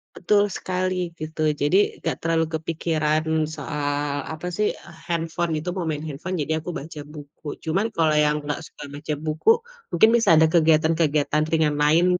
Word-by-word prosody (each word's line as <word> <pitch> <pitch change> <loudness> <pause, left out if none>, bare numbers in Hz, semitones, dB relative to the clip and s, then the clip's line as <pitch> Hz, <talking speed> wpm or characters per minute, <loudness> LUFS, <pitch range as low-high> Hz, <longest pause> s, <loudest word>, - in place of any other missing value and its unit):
Betul 205 +2 +3
sekali 185 -1 -2
gitu, 155 0 -6 0.2
jadi 145 +6 +3 0.3
gak - - -2
terlalu 165 0 +1
kepikiran 155 -1 0 0.3
soal 145 -2 -2
apa 175 +3 -5
sih 210 +2 +1 0.4
handphone 165 0 -1
gitu, 175 +3 -3
mau 175 -4 -2
main 150 0 -3
handphone 165 +5 -4
jadi 160 +1 -1
aku 160 - -7
baca 155 -2 -6
buku. 145 0 -9
Cuman 195 +8 +1
kalau 165 -8 +1
yang 150 0 +3
gak 145 +1 -3
suka 155 - -11
baca 150 +1 -4
buku, 155 0 +1 0.4
mungkin 220 +6 +5
bisa 230 -3 +3
ada 160 - +6
kegiatan-kegiatan 155 -2 +3
ringan 155 -2 +2
lain. 160 +4 +4
160 Hz, 155 wpm, -24 LUFS, 150-170 Hz, 0.4 s, ada